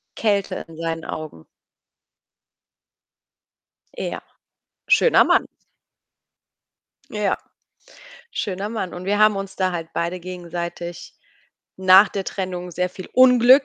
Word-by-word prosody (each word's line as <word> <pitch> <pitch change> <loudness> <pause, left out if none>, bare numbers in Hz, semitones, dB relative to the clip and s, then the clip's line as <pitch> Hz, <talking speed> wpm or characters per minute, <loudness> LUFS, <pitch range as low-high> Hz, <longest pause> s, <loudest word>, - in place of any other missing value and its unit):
Kälte 205 -3 0
in 165 -1 -13
seinen 165 -1 -3
Augen. 155 - -7 2.5
Ja, - - -4 0.7
schöner - - +5
Mann. - - +3 1.7
Ja, 210 -2 0 0.9
schöner 195 +1 -3
Mann. 215 -5 -4
Und 175 +1 -7
wir 205 +2 0
haben 215 -1 +5
uns 195 0 -6
da 185 -1 0
halt 165 -2 -4
beide 170 +2 -2
gegenseitig 175 -1 -6 0.6
nach 190 +2 +7
der 195 -1 -4
Trennung 180 -2 -4
sehr 180 +2 -1
viel 185 0 -10
Unglück 255 +1 +7
185 Hz, 105 wpm, -22 LUFS, 175-205 Hz, 2.5 s, nach